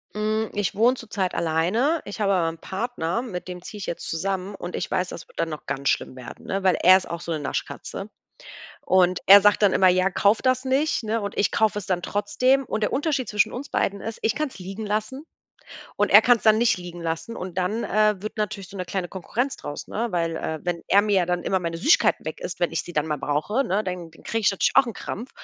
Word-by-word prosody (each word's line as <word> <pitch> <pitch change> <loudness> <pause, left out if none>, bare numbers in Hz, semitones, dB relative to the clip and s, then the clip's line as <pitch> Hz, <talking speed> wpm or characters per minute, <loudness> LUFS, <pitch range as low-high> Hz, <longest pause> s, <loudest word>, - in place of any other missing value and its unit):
Hm, 215 +1 -1
ich 205 -2 -1
wohne 235 +5 +4
zurzeit 205 -6 -3
alleine. 180 - +1
Ich 205 +2 -7
habe 200 -1 +2
aber 175 -3 +2
'n 165 0 -4
Partner, 190 0 -3
mit 185 -7 -6
dem 180 -1 -7
ziehe 210 - -9
ich 195 - -5
jetzt 170 - -5
zusammen. 195 +3 -3
Und 175 -1 -7
ich - - -3
weiß, 180 0 -1
das - - -9
wird - - -23
dann 165 - -1
noch 155 -2 -7
ganz 140 +1 -1
schlimm - - -1
werden, 125 -2 -10
ne, 195 0 -2
weil 185 -2 +4
er 185 +2 +8
ist 190 - 0
auch 170 - -4
so 170 0 -4
'ne 155 - -2
Naschkatze. 140 - -5 0.7
Und 185 -1 +3
er 200 +1 +10
sagt 205 0 +4
dann 205 -3 +4
immer: 185 - +5
„Ja, 185 +1 +3
kauf 200 +3 +2
das 255 0 +1
nicht,“ 270 +3 +1
ne? 220 +1 -1
Und 200 -1 -5
ich 205 - +2
kaufe 215 -1 +2
es 205 - -6
dann 180 0 -1
trotzdem. 230 +8 +1
Und 215 - -3
der 210 - 0
Unterschied 275 -4 -1
zwischen 210 -1 +1
uns 275 +3 -6
beiden 200 0 -1
ist, 225 +2 -6
ich 220 - +1
kann's 305 -7 -3
liegen 195 +4 -6
lassen 215 +8 -3 0.7
und - - +2
er - - +10
kann's 245 -2 +3
dann 215 -1 +5
nicht 235 -2 +3
liegen 175 -1 -8
lassen 165 +7 -4
und 185 -1 -7
dann, 190 +5 -1
äh, 215 0 +2
wird 215 +1 -6
natürlich 205 -3 -3
so 200 - -10
'ne 185 - -3
kleine 180 -1 -3
Konkurrenz 240 +8 -3
draus, 145 - -7
ne? 230 +2 -2
Weil, 165 -2 -1
äh, 160 0 -4
wenn 175 -1 -2
er 200 - +5
mir 200 -4 +2
dann 175 0 -1
immer 190 - +1
meine 165 -2 -4
Süßigkeiten 300 - +3
weg - - -5
isst, - - -6
wenn - - +1
ich - - -2
sie 175 - -10
dann 150 0 0
mal 150 -1 -2
brauche, 155 - -1
ne, 200 +4 0
dann 180 -4 -5
kriege 225 +7 -4
ich 210 - +3
natürlich 195 - +1
auch 260 - +6
'n 230 - -4
Krampf. 240 +6 -6
195 Hz, 245 wpm, -24 LUFS, 175-220 Hz, 0.7 s, er